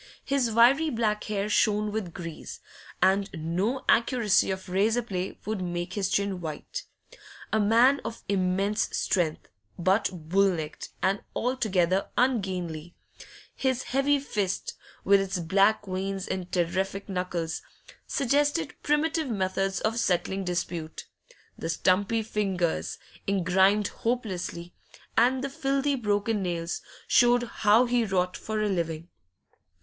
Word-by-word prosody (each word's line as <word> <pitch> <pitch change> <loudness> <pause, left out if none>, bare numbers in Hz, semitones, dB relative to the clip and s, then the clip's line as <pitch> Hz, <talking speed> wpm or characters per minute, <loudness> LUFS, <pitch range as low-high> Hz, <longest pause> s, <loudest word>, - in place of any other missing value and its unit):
His 275 -4 +1
wiry 250 +8 +5
black 220 -4 0
hair 205 -1 -1
shone 210 0 +2
with 205 -5 -3
grease, 165 -2 -8 0.4
and 195 +1 +3
no 180 +11 -1
accuracy 230 -4 +3
of 190 0 -4
razor 215 +6 +2
play 190 -4 -4
would 215 -2 -2
make 175 0 -3
his 195 -2 -1
chin 200 -2 0
white. 165 - -6 0.7
A 220 - +3
man 235 +6 +4
of 230 - -6
immense 195 +2 +1
strength, 170 -5 0 0.3
but 190 +4 +2
bull 185 +3 +2
necked 155 -2 -6
and 195 +1 +2
altogether 195 -7 +1
ungainly 180 -9 -1 0.6
his 260 -1 0
heavy 275 +2 +2
fist, 205 -8 -2 0.3
with 200 0 +5
its 195 0 -2
black 195 +5 +2
veins 190 0 -3
and 180 -1 -4
terrific 190 +3 -1
knuckles, 180 -4 -3 0.5
suggested 290 +3 +1
primitive 305 0 +1
methods 195 -2 -1
of 225 +2 0
settling 190 0 0
dispute; 175 -3 -4 0.5
the 165 - -3
stumpy 200 +6 +2
fingers, 195 -6 -1 0.3
engrimed 195 +2 +3
hopelessly, 185 -7 -3 0.4
and 255 +3 +3
the 275 - -2
filthy 275 +1 0
broken 210 -3 0
nails, 170 -2 -3 0.3
showed 245 0 +5
how 230 0 +3
he 245 -1 +2
wrought 185 -3 0
for 215 -1 -3
a - - +1
living. 165 -4 -2
200 Hz, 125 wpm, -27 LUFS, 180-230 Hz, 0.7 s, wiry